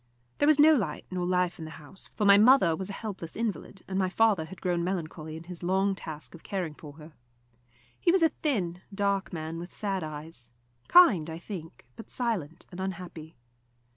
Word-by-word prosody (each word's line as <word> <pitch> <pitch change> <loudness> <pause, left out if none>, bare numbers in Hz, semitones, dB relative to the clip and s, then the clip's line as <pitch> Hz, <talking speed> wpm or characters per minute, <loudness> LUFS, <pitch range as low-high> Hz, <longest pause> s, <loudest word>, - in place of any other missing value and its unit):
There 290 - +4
was 310 -1 +6
no 310 +2 +8
light 185 - -2
nor 180 -1 -2
life 180 -1 +1
in 160 - -6
the - - -7
house, 155 +6 -8
for 210 - -2
my 200 0 +9
mother 210 -5 +6
was 190 +4 -4
a - - -4
helpless 195 -7 -6
invalid, 210 -4 -4
and 190 0 -1
my 185 -1 +1
father 205 -5 +3
had 185 +3 -11
grown 175 -2 0
melancholy 160 -3 -4
in 165 - -9
his 175 0 -8
long 190 +3 +2
task 155 -5 -8
of 170 - -12
caring 180 -6 -3
for 150 -1 -11
her. 155 +1 -13 0.9
He 340 - +3
was 365 -1 +4
a 325 - +6
thin, 190 - -2
dark 200 -1 0
man, 160 -1 -5
with 175 +1 -8
sad 195 -4 -2
eyes; 150 -5 -6 0.4
kind, 200 - +6
I 160 - -5
think, 170 -2 -9
but 225 - -11
silent 190 - -2
and 180 - -9
unhappy. 175 -5 -6
180 Hz, 200 wpm, -28 LUFS, 160-200 Hz, 0.9 s, my